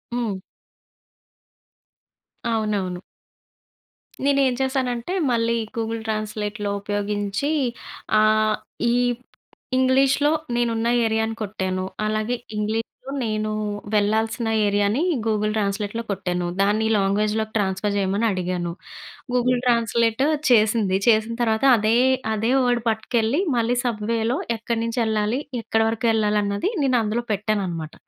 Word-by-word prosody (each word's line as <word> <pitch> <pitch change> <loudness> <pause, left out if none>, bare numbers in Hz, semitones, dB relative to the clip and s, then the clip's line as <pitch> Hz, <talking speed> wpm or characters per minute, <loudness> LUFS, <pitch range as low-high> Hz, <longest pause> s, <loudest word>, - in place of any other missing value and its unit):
హ్మ్. 215 -6 -2 2.1
అవునవును. 205 -5 -1 1.2
నేను 280 0 +3
ఏం 255 - +1
చేశానంటే, 260 +2 -1 0.2
మళ్ళీ 230 0 +1 0.2
గూగుల్ 225 0 -2
ట్రాన్స్లేట్‌లో 215 -1 -3
ఉపయోగించి, 205 +5 -2 0.7
ఆహ్, 215 0 +3 0.4
ఈ - - +2 0.8
ఇంగ్లీష్‌లో 270 +3 +3 0.2
నేను 240 0 +1
ఉన్న 225 - 0 0.2
ఏరియాని 220 0 0
కొట్టాను. 190 -3 -2 0.2
అలాగే 215 +3 0 0.2
ఇంగ్లీష్‌లో 215 +2 -1 0.4
నేను 215 -1 -1 0.4
వెళ్ళాల్సిన 220 +3 +1 0.2
ఏరియాని 205 +5 +1 0.3
గూగుల్ 215 -1 +1
ట్రాన్స్లేట్‌లో 205 +2 -2
కొట్టాను. 180 -2 -2
దాన్ని 210 +2 +2
ఈ - - +1
లాంగ్వేజ్‌లోకి 210 +2 0
ట్రాన్స్ఫర్ 200 0 -1
చేయమని 200 +3 0
అడిగాను. 180 -2 -2 0.6
గూగుల్ 250 0 +2
ట్రాన్స్లేట్ 235 0 +2 0.3
చేసింది. 215 -4 +3
చేసిన 220 0 +3
తర్వాత 220 +1 +1
అదే, 215 +2 +2 0.4
అదే 220 +3 0
వర్డ్ 245 -1 +2
పట్టుకెళ్ళి 225 +4 0 0.2
మళ్ళీ 235 +1 +1
సబ్‌వే‌లో 230 +1 0 0.2
ఎక్కడి 230 +1 -2
నుంచి 230 +2 -2
వెళ్ళాలి, 220 +2 0 0.2
ఎక్కడ 225 0 0
వరకు 225 +1 -3
వెళ్ళాలి, 210 -1 +2
అన్నది 200 - -1
నేను 255 -2 +3
అందులో 220 +3 -1
పెట్టాను 210 0 0
అన్నమాట. 165 -3 -5
220 Hz, 110 wpm, -23 LUFS, 205-235 Hz, 2.1 s, నేను